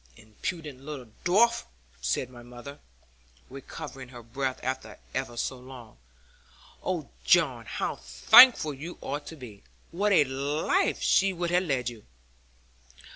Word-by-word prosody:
'Impudent 135 - -6
little 135 -5 -8
dwarf!' 230 +6 +3 0.4
said 120 - -1
my 120 -1 -12
mother, 125 +4 -11 0.7
recovering 135 -1 -9
her 120 -2 -11
breath 130 +3 -3
after 130 +1 -4 0.2
ever 130 -3 -3
so 130 +2 -3
long. 125 - -12 0.9
'Oh, 170 -6 -3
John, 135 -10 +3
how - - -3
thankful 145 - +7
you 155 +6 -8
ought 145 +2 -5
to 160 - -8
be! 115 -8 -11 0.3
What 205 +4 0
a 180 - +6
life 145 - 0
she 195 0 +3
would 175 -1 -2
have 180 +1 +2
led 130 -6 -1
you!' 115 -3 -12
135 Hz, 130 wpm, -28 LUFS, 125-170 Hz, 0.9 s, thankful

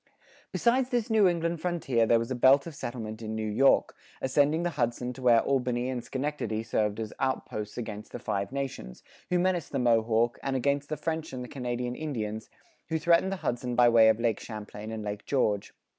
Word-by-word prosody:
Besides 250 +2 +2
this 240 -3 -1
New 215 -3 +5
England 170 -1 -1
frontier 140 -10 +1
there 115 - +5
was 115 +2 -3
a - - 0
belt 135 +3 +5
of 165 - -7
settlement 115 -5 -6
in 110 0 -4
New 110 0 -2
York, 120 +6 +3 0.2
ascending 145 +5 +2
the 175 - 0
Hudson 125 -3 -1
to 130 - -11
where 120 -2 +5
Albany 125 -2 0
and 125 -2 -4
Schenectady 130 -6 -3
served 105 -1 -1
as 110 -1 -4
outposts 110 -5 -3
against 110 -3 -6
the - - -5
Five 100 +2 -3
Nations, 135 - -5 0.3
who 180 - +2
menaced 175 -3 0
the 140 - -1
Mohawk, 115 -1 +2
and 135 -1 -2
against 140 +2 0
the 155 - -2
French 160 0 -3
and 125 -1 -4
the - - -7
Canadian 125 -2 -3
Indians, 110 -8 -4 0.4
who 160 - +1
threatened 170 +4 +3
the - - -1
Hudson 120 0 -1
by 120 0 +6
way 115 -1 +7
of 110 0 +2
Lake 115 -3 +1
Champlain 110 -1 -8
and 110 -1 -5
Lake 105 -1 -5
George. 105 -7 0
125 Hz, 200 wpm, -28 LUFS, 110-150 Hz, 0.4 s, way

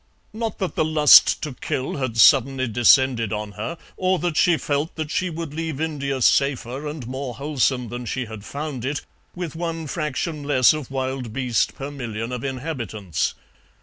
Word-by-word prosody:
Not 225 -1 -3
that 190 - -2
the - - +1
lust 155 -1 +6
to 150 - -3
kill 130 +2 -3
had 130 -4 -3
suddenly 135 +1 +5
descended 120 0 +4
on 105 -1 -3
her, 105 +12 -5 0.2
or 185 0 +2
that 175 -2 -2
she 170 +1 +4
felt 145 +3 -2
that 155 -2 -4
she 185 - 0
would 165 -3 -6
leave 160 -2 -4
India 140 -4 -2
safer 140 +1 +1
and 150 -4 -6
more 130 0 -5
wholesome 130 -3 0
than 120 0 -6
she 130 +3 -2
had 110 -2 -9
found 140 -1 -5
it, 140 +3 -2 0.3
with 175 -4 -5
one 165 -1 -3
fraction 155 +1 -3
less 135 -3 +4
of 155 -4 -5
wild 130 -3 -3
beast 125 -3 0
per 140 +1 -6
million 115 -4 -5
of 125 0 -4
inhabitants. 125 - -3
135 Hz, 175 wpm, -23 LUFS, 125-155 Hz, 0.3 s, lust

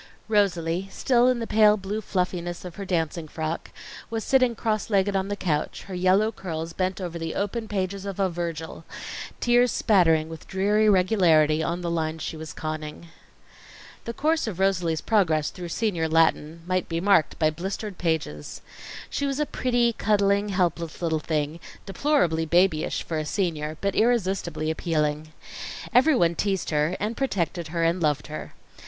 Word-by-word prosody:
Rosalie, 190 -4 +1
still 245 +4 +2
in 255 -1 +3
the 230 - -3
pale 215 -1 +5
blue 200 +2 -4
fluffiness 180 -3 -2
of 175 -2 -9
her 200 - -5
dancing 165 -3 -1
frock, 160 +1 -4 0.4
was 225 -1 -3
sitting 255 -3 +3
cross 215 -1 -1
legged 200 -1 +2
on 190 0 0
the 205 - -2
couch, 155 -7 -2
her 195 - -9
yellow 185 +4 +3
curls 165 -5 -5
bent 185 +1 -1
over 175 -2 -5
the 165 0 -4
open 220 +3 -2
pages 195 -1 -2
of 200 -1 -6
a 195 - +3
Virgil, 165 -2 -5 0.6
tears 245 0 +4
spattering 165 -6 +3
with 160 -1 -10
dreary 205 +3 +2
regularity 175 -6 +4
on 170 +2 -2
the 170 -1 -2
lines 160 -1 -2
she - - -4
was 155 -1 -7
conning. 155 +1 -6 1.0
The 235 - -4
course 315 +1 +1
of 200 -6 -4
Rosalie's 180 -4 +1
progress 160 -9 +2
through 175 -2 -7
senior 175 -5 -1
Latin 165 0 +2
might 185 0 -1
be 165 0 -1
marked 180 -4 +3
by 155 -2 +2
blistered 190 +4 -5
pages. 155 - -2 0.5
She 285 - -2
was 275 +1 -2
a 300 - +2
pretty, 240 -4 +1
cuddling, 205 -1 +2
helpless 170 -4 -1
little 160 -2 +1
thing, 155 +1 -2 0.3
deplorably 195 - +1
babyish 170 -1 +2
for 160 -2 -3
a - - -2
senior; 155 -5 -2
but 200 -1 0
irresistibly 190 -8 +1
appealing. 155 -1 -1 0.6
Everyone 250 - +4
teased 195 0 -1
her, 150 +4 +1
and 215 +3 -2
protected 180 - -1
her, 165 +1 -2
and 170 +2 +1
loved 150 -2 +1
her. 155 - -8
180 Hz, 165 wpm, -25 LUFS, 160-205 Hz, 1.0 s, pale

